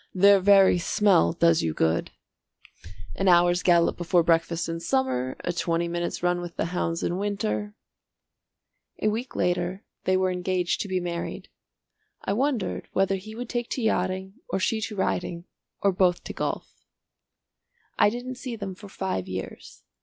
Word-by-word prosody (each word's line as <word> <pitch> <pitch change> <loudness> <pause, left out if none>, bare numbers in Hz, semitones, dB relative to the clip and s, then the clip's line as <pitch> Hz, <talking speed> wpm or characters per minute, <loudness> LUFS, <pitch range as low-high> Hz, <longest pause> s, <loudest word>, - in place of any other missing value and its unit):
"Their 200 +1 +6
very 195 -1 +6
smell 190 - +3
does 85 -1 +3
you 80 -1 -2
good. 80 +1 +1 1.0
An 195 - -1
hour's 175 0 +5
gallop 170 -2 +3
before 175 0 +2
breakfast 165 0 +1
in 165 0 -3
summer, 165 - -1
a 175 - -1
twenty 170 0 0
minutes' 175 0 -3
run 175 0 +1
with 175 -1 -7
the - - -1
hounds 165 -1 -1
in 175 +2 -1
winter 105 - -2 0.6
" - - -44
A 215 - +4
week 230 +5 -4
later 180 +2 -1 0.2
they 185 0 +3
were 185 0 +1
engaged 180 0 -1
to - - -3
be 185 -1 0
married. 170 -1 -5 0.8
I - - 0
wondered 250 -3 -1
whether 195 0 +2
he 215 +3 -10
would 245 +1 -5
take 240 0 -3
to 255 - -3
yachting 190 -2 -1
or - - -1
she 220 +3 0
to 215 0 -4
riding 175 -3 -2 0.4
or 200 - +4
both 180 -1 +2
to - - -6
golf. - - -4 1.2
I - - +6
didn't 245 +2 -6
see 250 -4 -5
them 200 -3 -5
for 200 +2 -12
five 190 - -3
years. 95 0 -7
185 Hz, 165 wpm, -26 LUFS, 170-200 Hz, 1.2 s, Their